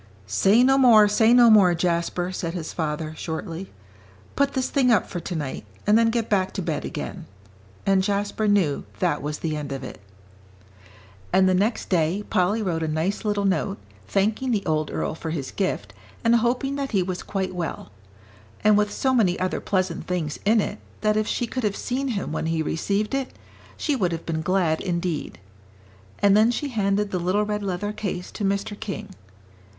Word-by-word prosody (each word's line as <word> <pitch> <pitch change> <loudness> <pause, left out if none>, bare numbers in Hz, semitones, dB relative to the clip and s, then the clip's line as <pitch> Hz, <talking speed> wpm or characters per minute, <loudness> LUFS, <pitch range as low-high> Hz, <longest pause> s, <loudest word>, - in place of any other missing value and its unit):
"Say 195 - +4
no 270 +1 +4
more, 225 -5 +7
say 220 +2 +4
no 240 -1 +7
more, 190 -5 +6
Jasper," 175 +1 -1
said 170 -2 -4
his 165 -3 -5
father, 155 -1 -3
shortly; 165 +3 -5 0.6
"put 280 0 +1
this 260 -1 0
thing 265 -3 +2
up 225 -5 +4
for 175 - -5
tonight, 155 -5 -4 0.2
and 210 - +4
then 230 0 +5
get 230 -1 -1
back 190 -3 +1
to - - -3
bed - - -2
again." - - -6 0.6
And 195 -1 +4
Jasper 205 +2 -1
knew 190 -9 +2
that 150 - 0
was 150 +1 -3
the 155 -2 -2
end 145 -2 -5
of 135 -1 -4
it. 125 - -9 1.3
And 190 0 +4
the 185 - +3
next 205 +6 0
day 180 +3 +1
Polly 200 +5 +2
wrote 170 -4 -1
a 160 - -1
nice 160 +6 -1
little 205 -2 0
note, 195 +1 0 0.3
thanking 215 +6 0
the 215 -5 0
old 155 -1 0
earl - - -2
for 160 0 -6
his 150 -5 -4
gift, 195 -2 -2 0.3
and 230 0 +4
hoping 250 +4 0
that 275 -3 -3
he 190 -3 +3
was 180 0 -4
quite 190 -2 -3
well; 170 - -5 0.7
and 210 0 +5
with 210 0 +1
so 265 -1 0
many 195 -8 +2
other 185 0 -1
pleasant 185 -4 -1
things 170 -5 -2
in 220 +2 +4
it, 205 0 -2 0.2
that 215 0 +2
if 215 0 +1
she 245 - -1
could 255 +2 -4
have 205 -2 0
seen 265 +3 -2
him 210 - -2
when 160 - -2
he 165 -1 0
received 200 - -1
it, 270 -1 -2 0.4
she 295 - 0
would 185 -8 0
have 165 - -5
been 160 -1 -2
glad 170 -2 +1
indeed. 170 - -2 0.8
And 200 0 +4
then 215 +2 +5
she 280 +4 -2
handed 205 -3 0
the 185 - -1
little 185 +4 +1
red 210 0 -2
leather 200 +1 -3
case 180 -4 -4
to 210 - -6
Mr. 200 +1 0
King. 200 - -5
195 Hz, 190 wpm, -24 LUFS, 170-215 Hz, 1.3 s, more